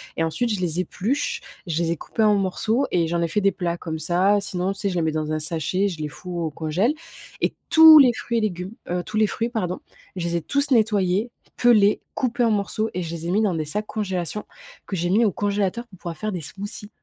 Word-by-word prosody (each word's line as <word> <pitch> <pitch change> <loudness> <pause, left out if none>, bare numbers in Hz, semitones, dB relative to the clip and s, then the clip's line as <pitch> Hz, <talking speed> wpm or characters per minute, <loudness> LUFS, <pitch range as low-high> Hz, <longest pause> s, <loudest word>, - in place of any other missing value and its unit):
et 165 - 0
ensuite 225 +8 -1
je 190 - -3
les 175 0 -1
épluche. 225 +9 -2 0.2
Je 170 0 -1
les 165 - 0
ai 170 - -1
coupés 220 - -2
en 210 -1 +5
morceaux 215 +7 0
et 170 -2 +2
j'en 170 +1 -1
ai 170 - +1
fait 205 +6 0
des 195 0 +3
plats. 175 -2 -2
Comme 160 -2 -5
ça, 180 +6 +2
sinon, 190 -1 -1
tu - - -14
sais, 200 - 0
je 180 - -4
les 170 - +1
mets 160 -1 +1
dans 155 0 -2
un 155 - 0
sachet, 165 +5 0
je 170 -5 -5
les 150 - -2
fous 175 +2 -7
au 160 -2 -1
congèle. 165 - 0 0.5
Et - - +1 0.2
tous 320 -1 +10
les 255 -3 +7
fruits 235 +1 -3
et - - +1
légumes, 185 0 -3 0.2
heu, 175 0 -1
tous 215 0 -5
les 215 -1 +4
fruits 230 +3 -2
pardon, 185 -6 -2 0.4
je 170 -1 -2
les 170 0 0
ai - - -2
tous 280 - -1
nettoyés, 210 -1 +2 0.3
pelés, 215 -4 +4
coupés 245 -1 0
en 225 - +2
morceaux 215 +2 -1
et 180 0 -2
je 165 0 -5
les 165 0 -5
ai - - -1
mis 210 +3 +2
dans 200 -5 +1
des 155 -1 -2
sacs 210 +7 -3
congélation, 195 -2 -3 0.4
que 195 - -4
j'ai 175 0 -1
mis 220 +4 +4
au 205 - +2
congélateur, 205 +4 -1
pour 185 -5 -17
pouvoir 170 -2 -6
faire 215 +4 -3
des 180 -3 -4
smoothies. 205 +6 -6
190 Hz, 255 wpm, -23 LUFS, 170-215 Hz, 0.5 s, tous